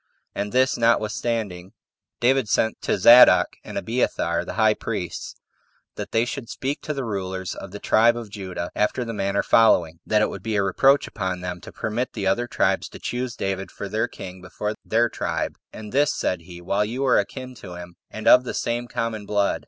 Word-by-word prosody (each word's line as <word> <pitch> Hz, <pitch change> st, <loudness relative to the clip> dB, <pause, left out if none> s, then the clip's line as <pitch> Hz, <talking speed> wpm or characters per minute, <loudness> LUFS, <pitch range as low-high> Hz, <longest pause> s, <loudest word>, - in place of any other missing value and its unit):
And, 105 Hz, 0 st, -3 dB
this 130 Hz, -1 st, +2 dB
notwithstanding, 110 Hz, -4 st, 0 dB, 0.5 s
David 130 Hz, -2 st, +2 dB
sent 110 Hz, 0 st, +1 dB
to -, -, 0 dB
Zadok 120 Hz, +1 st, +7 dB
and -, -, -7 dB
Abiathar -, -, 0 dB
the -, -, -6 dB
high 110 Hz, -1 st, +4 dB
priests, -, -, -5 dB, 0.6 s
that -, -, -7 dB
they 115 Hz, +1 st, +2 dB
should 120 Hz, -2 st, -6 dB
speak 140 Hz, +3 st, -3 dB
to 150 Hz, -, -3 dB
the 135 Hz, -2 st, -3 dB
rulers 95 Hz, -3 st, -4 dB
of 95 Hz, -, -8 dB
the 100 Hz, -, -8 dB
tribe 115 Hz, +3 st, +3 dB
of 115 Hz, -4 st, -7 dB
Judah 95 Hz, -4 st, -5 dB
after 115 Hz, +4 st, 0 dB
the 115 Hz, -, -4 dB
manner 100 Hz, -1 st, 0 dB
following: 85 Hz, -8 st, +4 dB
That 105 Hz, 0 st, +3 dB
it -, -, +1 dB
would -, -, -7 dB
be 110 Hz, -1 st, -2 dB
a 100 Hz, -, +2 dB
reproach 135 Hz, +9 st, +3 dB
upon 95 Hz, -4 st, -3 dB
them 90 Hz, -1 st, -5 dB
to -, -, -10 dB
permit 115 Hz, +4 st, -3 dB
the 100 Hz, -4 st, -3 dB
other 120 Hz, +6 st, +1 dB
tribes -, -, 0 dB
to -, -, -11 dB
choose 125 Hz, -1 st, -3 dB
David 95 Hz, 0 st, -3 dB
for 100 Hz, -, -7 dB
their 110 Hz, +4 st, -1 dB
king 95 Hz, -4 st, -9 dB
before 105 Hz, +3 st, -4 dB
their 115 Hz, +2 st, +2 dB
tribe, -, -, -3 dB, 0.2 s
"and 105 Hz, -1 st, -9 dB
this," 145 Hz, +3 st, +2 dB
said 90 Hz, -2 st, -1 dB
he, 85 Hz, +1 st, -11 dB
"while 100 Hz, +4 st, 0 dB
you 125 Hz, +6 st, -2 dB
are 130 Hz, -, +4 dB
akin 130 Hz, +5 st, -5 dB
to 90 Hz, -, -9 dB
him, 90 Hz, 0 st, -9 dB, 0.2 s
and 110 Hz, -, -6 dB
of 125 Hz, -, +8 dB
the 125 Hz, -, -5 dB
same 120 Hz, +1 st, -2 dB
common 110 Hz, -3 st, -3 dB
blood." 100 Hz, -1 st, +1 dB
110 Hz, 200 wpm, -23 LUFS, 95-120 Hz, 0.6 s, of